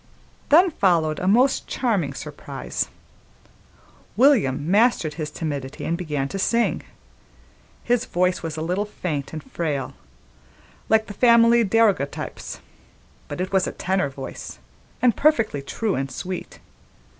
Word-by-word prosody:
Then 345 +5 +6
followed 165 - +2
a 185 - -2
most 250 +7 +3
charming 205 - -1
surprise. - - -5 1.3
William 190 - +3
mastered 205 -7 +3
his 155 -1 -4
timidity 145 -3 -5
and 170 - 0
began 150 -6 -2
to 195 - -4
sing. 235 +4 +1 1.0
His 245 0 +1
voice 180 +1 0
was 160 -2 -5
a 155 - -3
little 180 +5 -1
faint 155 -9 -4
and 155 -2 -6
frail, 150 -6 -3 1.0
like 220 0 +4
the 205 - -8
family 235 +1 +5
daguerreotypes, 205 -9 0 0.7
but - - -6
it 185 +1 -2
was 190 -1 +3
a - - -2
tenor 185 -6 0
voice, 135 - -8 0.5
and 240 -4 +4
perfectly 230 - +2
true 210 +9 -2
and 135 +1 -2
sweet. 180 +6 -6
185 Hz, 130 wpm, -23 LUFS, 155-230 Hz, 1.3 s, Then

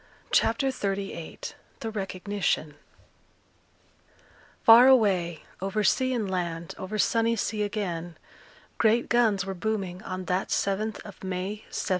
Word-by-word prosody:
CHAPTER 270 +4 +3
XXXVIII 195 -7 -4 0.4
THE 225 - -3
RECOGNITION 195 -5 -2 1.9
Far 235 +3 +9
away, 190 -10 +3 0.2
over 195 +2 -1
sea 260 +5 +2
and 230 -5 -1
land, 170 -3 -3
over 195 +3 -4
sunny 230 +2 +2
sea 215 -1 -2
again, 175 -6 -3 0.6
great 230 +2 +3
guns 220 -5 +3
were 195 - -3
booming 190 -2 -3
on 185 0 -5
that 185 +1 0
7th 205 +2 -1
of 205 -2 -12
May, 185 0 -2 0.2
1799. - - -4
200 Hz, 120 wpm, -27 LUFS, 185-220 Hz, 1.9 s, Far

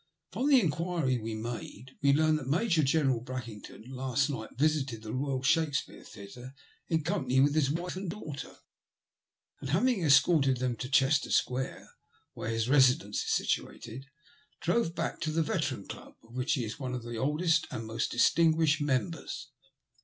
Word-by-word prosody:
From 275 +4 0
inquiriei 160 - +1
made 120 +1 -7
we 140 -1 +4
learn 155 +2 +3
that 140 -4 -7
Major 170 +3 +2
General 135 -4 +2
Brackington 120 -5 -8
last 135 +2 -1
night 110 -5 -5
visited 140 -6 0
the 110 - -6
Boyal 130 0 -2
Shakespeare 150 0 0
Theatre 120 +7 -11 0.3
in 160 -2 0
company 130 -2 0
with 140 +2 +4
his 150 -3 +2
wife 175 +5 -3
and 190 -1 -4
daughter, 155 -8 -7 1.0
and 135 - -6
having 210 - +2
escorted 140 -2 +4
them 125 -1 -1
to 125 +3 -5
Chester 135 +1 +3
Square, 130 +1 -1 0.5
where 105 - -5
his 115 0 -1
residence 130 -6 +4
is - - -4
situated, 125 +4 -2 0.5
drove 180 -8 0
back 165 -1 -3
to 155 - -1
the 160 +1 +1
Veteran 150 - -2
Club, - - -10
of 115 +1 -18
which 130 +5 0
he 130 -6 -1
is 110 +6 -7
one 130 -2 -3
of 125 - -5
the 120 0 -6
oldest 160 +6 +1
and 110 - -5
most 110 +1 -2
distinguished 160 +3 +3
members. 145 0 -2
135 Hz, 160 wpm, -30 LUFS, 125-160 Hz, 1.0 s, we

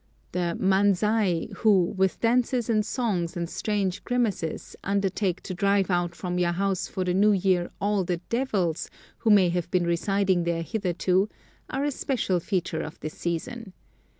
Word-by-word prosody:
The 175 -1 -1
manzai, 195 -1 +2
who, 195 -6 +3
with 190 0 +1
dances 240 0 +2
and 215 -1 +3
songs 195 -8 -1
and 170 -1 -2
strange 195 0 -2
grimaces, 220 -10 -2
undertake 195 -1 0
to 185 - -5
drive 195 +1 +2
out 175 -1 0
from 180 -1 -3
your 175 -1 +2
house 195 0 -1
for 185 - -3
the 180 -1 0
new 205 +3 +4
year 185 -2 +1
all 205 -1 +1
the 175 0 -1
devils 190 -5 -1 0.3
who 230 - 0
may 200 -4 +6
have 175 -1 -2
been 180 -2 +1
residing 185 +1 +1
there 170 0 -1
hitherto, 190 0 0 0.4
are 270 +1 -2
a 290 - +1
special 240 -9 0
feature 170 -3 -2
of 155 - -7
this 155 +1 -5
season. 190 +5 -4
190 Hz, 160 wpm, -26 LUFS, 175-210 Hz, 0.4 s, may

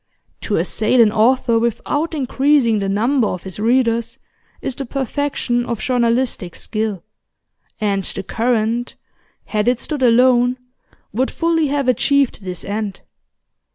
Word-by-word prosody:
To - - -1
assail 225 +3 +1
an 220 -3 +6
author 230 +1 +3
without 290 +8 -1
increasing 265 -4 +2
the 195 -1 -2
number 230 +4 +2
of 180 -3 -4
his 190 +1 -7
readers 230 0 +1 0.4
is - - -4
the 275 - -4
perfection 265 -1 -2
of 235 -2 -4
journalistic 235 -6 0
skill, 215 -5 -3 0.8
and 200 -3 0
The 195 - -5
Current, 230 +2 -1 0.5
had 210 0 -1
it 245 -1 +2
stood 300 -3 -5
alone, 245 0 +4 0.6
would 255 +5 0
fully 330 -2 +1
have 280 -1 -1
achieved 270 -2 +2
this 180 -2 -6
end. 205 -1 -4
235 Hz, 130 wpm, -19 LUFS, 215-260 Hz, 0.8 s, an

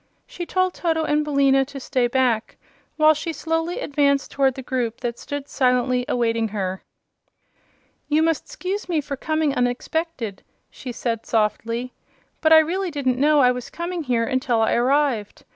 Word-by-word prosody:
She 350 -1 -7
told 370 -1 +1
Toto 325 -2 0
and 300 -1 +1
Billina 275 -2 +3
to 275 0 -9
stay 255 -2 0
back 240 -3 0 0.4
while 310 0 +6
she 310 +2 -4
slowly 325 +2 -2
advanced 280 -1 +1
toward 270 -2 +2
the 265 - -7
group 245 -3 -2
that 240 -1 -3
stood 285 -1 -5
silently 250 -1 +1
awaiting 230 -2 0
her. 190 -3 -3 1.3
"You 310 +1 +2
must 325 -1 0
'scuse 405 -5 -4
me 330 -3 +1
for 285 -1 -4
coming 310 +1 0
unexpected," 245 - -2 0.3
she 255 - -7
said, 230 -1 -3
softly, 230 +3 -1 0.5
"but 315 - +3
I 320 - +10
really 355 +4 +2
didn't 260 -5 -1
know 300 0 +5
I 250 -1 +5
was 250 -1 -5
coming 340 0 -4
here 245 -5 0
until 255 -2 0
I 220 - +2
arrived. 250 -3 +1
275 Hz, 160 wpm, -22 LUFS, 245-315 Hz, 1.3 s, I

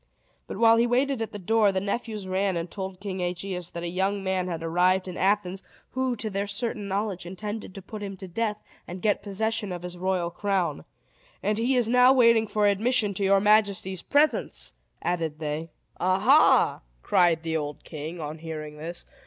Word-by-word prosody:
But, - - -6
while 230 +1 +6
he 235 +1 +3
waited 255 +1 +1
at 225 - -3
the 210 - -6
door, 210 +1 +3
the 190 - 0
nephews 210 +1 -3
ran 190 0 0
and 170 +1 -4
told 190 -2 -6
King 195 -2 -4
Aegeus 180 0 -3
that 170 - -6
a - - -2
young 190 +3 -1
man 190 -1 0
had 165 -2 -4
arrived 180 +3 +2
in 180 - -6
Athens, 195 -1 +1 0.3
who, 260 -1 0
to 220 - -5
their 200 -1 -2
certain 220 -1 -3
knowledge, 195 -2 -2
intended 205 +2 -6
to 195 - -8
put 215 +2 -8
him 195 -1 -6
to 190 - -8
death, 210 +3 -1 0.3
and 180 +1 -8
get 210 -2 +2
possession 210 +1 -2
of 175 -1 -5
his 180 0 -7
royal 180 -2 0
crown. 195 -1 -1 0.6
"And 210 +1 0
he 250 +3 +2
is 245 -3 +2
now 250 +2 +6
waiting 230 -3 +5
for 210 0 +1
admission 210 +1 +2
to 195 - -3
your 195 0 +5
majesty's 200 -3 +2
presence," 295 +2 +1 0.3
added 165 -3 -1
they. 155 +1 -4 0.3
"Aha!" 185 +1 +4 0.2
cried 170 -2 +3
the 165 -1 -2
old 150 -2 -3
king, 160 +2 -7
on 155 0 -5
hearing 155 -2 -7
this. 170 +3 -6
195 Hz, 190 wpm, -26 LUFS, 175-215 Hz, 0.6 s, while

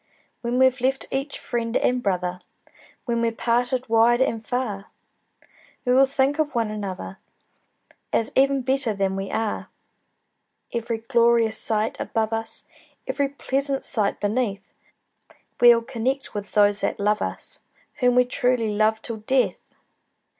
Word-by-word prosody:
When 240 +1 -1
we've 260 -1 +4
left 265 +1 0
each 275 +2 -2
friend 235 -1 -2
and 250 0 +1
brother, 180 -3 -1 0.6
When 235 -1 0
we're 230 0 +1
parted 245 +2 0
wide 230 +2 +4
and 230 -4 0
far, 220 -5 -3 1.0
We 250 - +3
will 270 +1 +6
think 275 +2 +1
of 300 -3 0
one 225 -2 0
another, 190 - -6 0.9
As 225 - +1
even 275 0 +3
better 260 -4 0
than 195 -1 0
we 195 0 -4
are. 220 -1 -2 1.0
Every 230 -1 -2
glorious 230 -1 +2
sight 220 0 -1
above 225 -1 -1
us, 225 0 -3 0.4
Every 280 -1 -1
pleasant 275 0 -1
sight 215 -6 -1
beneath, 205 -2 -2 0.9
We'll 240 -1 +7
connect 265 +2 -2
with 205 -1 -6
those 205 -1 +4
that - - -1
love 210 +1 +1
us, - - -4 0.4
Whom 250 -2 +3
we 250 0 +5
truly 245 -3 0
love 215 +1 +2
till 230 -2 -5
death! 255 +5 +1
235 Hz, 140 wpm, -24 LUFS, 215-255 Hz, 1.0 s, We'll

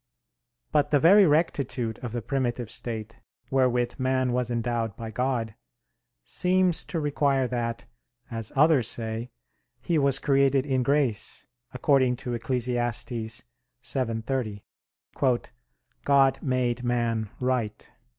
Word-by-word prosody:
But 145 -1 +2
the 145 - +4
very 190 +6 +7
rectitude 140 -7 0
of 120 - -6
the 120 -1 -4
primitive 125 -3 -2
state, 115 -2 -5 0.3
wherewith 125 -2 +1
man 130 -1 +1
was 125 -1 0
endowed 115 -2 -1
by 115 -1 -7
God, 120 -2 -1 0.7
seems 180 - +1
to 170 - -3
require 140 -3 +1
that, 120 -1 -3 0.5
as 115 -1 -4
others 140 -5 +4
say, 115 +1 -3 0.5
he 165 -3 0
was 140 -1 +4
created 135 -1 +2
in 130 -3 +1
grace, 130 -5 0 0.3
according 130 -1 +2
to 120 0 -5
Eccles. 120 +1 -1 1.2
7:30, 115 -3 -2 1.4
"God 135 -1 +4
made 125 -2 0
man 115 -3 0
right." 125 -5 -2
125 Hz, 110 wpm, -26 LUFS, 115-140 Hz, 1.4 s, very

